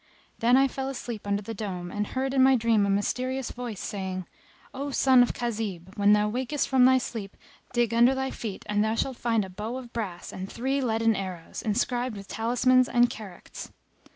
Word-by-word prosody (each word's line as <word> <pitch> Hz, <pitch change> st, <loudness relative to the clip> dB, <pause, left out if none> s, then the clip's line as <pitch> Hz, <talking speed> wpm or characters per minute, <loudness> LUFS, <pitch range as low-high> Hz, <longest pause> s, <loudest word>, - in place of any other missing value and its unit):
Then 240 Hz, +3 st, +5 dB
I 270 Hz, 0 st, +5 dB
fell 265 Hz, +1 st, -4 dB
asleep 240 Hz, -5 st, -6 dB
under 200 Hz, +1 st, 0 dB
the 225 Hz, +3 st, -5 dB
dome, 185 Hz, -4 st, -5 dB
and 210 Hz, 0 st, -2 dB
heard 265 Hz, +1 st, -2 dB
in 265 Hz, -, +4 dB
my 265 Hz, 0 st, +6 dB
dream 225 Hz, -4 st, +2 dB
a -, -, -1 dB
mysterious 255 Hz, +6 st, -1 dB
Voice[FN#262] 240 Hz, -4 st, -6 dB
saying, 185 Hz, -2 st, -4 dB, 0.5 s
"O 280 Hz, +2 st, -4 dB
son 260 Hz, -2 st, +5 dB
of 245 Hz, -, +2 dB
Khazib! 210 Hz, -6 st, -4 dB
when 205 Hz, 0 st, +5 dB
thou 210 Hz, 0 st, +3 dB
wakest 260 Hz, +6 st, -1 dB
from 260 Hz, -2 st, +5 dB
thy 260 Hz, 0 st, +6 dB
sleep 225 Hz, -5 st, -5 dB, 0.3 s
dig 240 Hz, -2 st, +1 dB
under 240 Hz, +3 st, +5 dB
thy 265 Hz, 0 st, -2 dB
feet 210 Hz, -5 st, -6 dB
and 210 Hz, 0 st, +1 dB
thou 220 Hz, +1 st, 0 dB
shalt 260 Hz, +2 st, -2 dB
find 225 Hz, -4 st, +1 dB
a -, -, -10 dB
bow 215 Hz, +6 st, -5 dB
of 250 Hz, -2 st, -10 dB
brass 195 Hz, -7 st, -5 dB
and 190 Hz, +1 st, -6 dB
three 270 Hz, +3 st, -1 dB
leaden 225 Hz, -2 st, +2 dB
arrows, 185 Hz, -4 st, -6 dB
inscribed 240 Hz, +1 st, -1 dB
with 195 Hz, 0 st, -9 dB
talismans 250 Hz, +4 st, +2 dB
and 240 Hz, 0 st, +4 dB
characts. 200 Hz, -5 st, -9 dB
230 Hz, 200 wpm, -27 LUFS, 205-255 Hz, 0.5 s, my